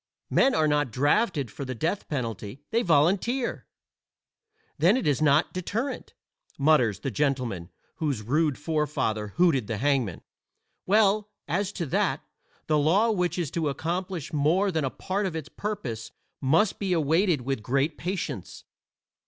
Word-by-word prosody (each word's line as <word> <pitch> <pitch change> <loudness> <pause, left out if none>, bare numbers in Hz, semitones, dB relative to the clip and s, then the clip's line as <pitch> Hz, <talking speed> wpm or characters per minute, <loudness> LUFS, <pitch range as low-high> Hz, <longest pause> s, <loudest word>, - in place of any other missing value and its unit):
Men 270 - +4
are 155 -1 +3
not 145 -2 +1
drafted 145 - +1
for - - -6
the 130 -1 -4
death 170 - -2
penalty; 115 -2 -4
they 230 +1 +2
volunteer. 195 - +1 1.1
"Then 180 - +5
it 260 - -2
is 145 -1 +1
not 145 0 +3
deterrent," 215 +9 -4 0.4
mutters 125 -9 +3
the 135 - -2
gentleman 120 - -1 0.3
whose 140 -9 -1
rude 150 +4 +1
forefather 145 -9 -1
hooted 155 - +3
the 110 - -2
hangman. 130 - 0 0.6
Well, 210 +1 +3 0.2
as 190 +6 -1
to 170 - -3
that, 135 - 0 0.4
the 155 -1 +2
law 195 +10 +3
which 180 -4 0
is 170 -6 -2
to 160 -3 0
accomplish 170 +3 -3
more 165 +7 +2
than 160 -3 0
a - - 0
part 195 +8 -2
of 170 - -5
its 160 -1 -5
purpose 140 - -4 0.3
must 165 +10 +2
be 195 -3 0
awaited 165 0 +2
with 135 -1 -2
great 135 +7 0
patience. 175 - -4
155 Hz, 145 wpm, -27 LUFS, 135-185 Hz, 1.1 s, Then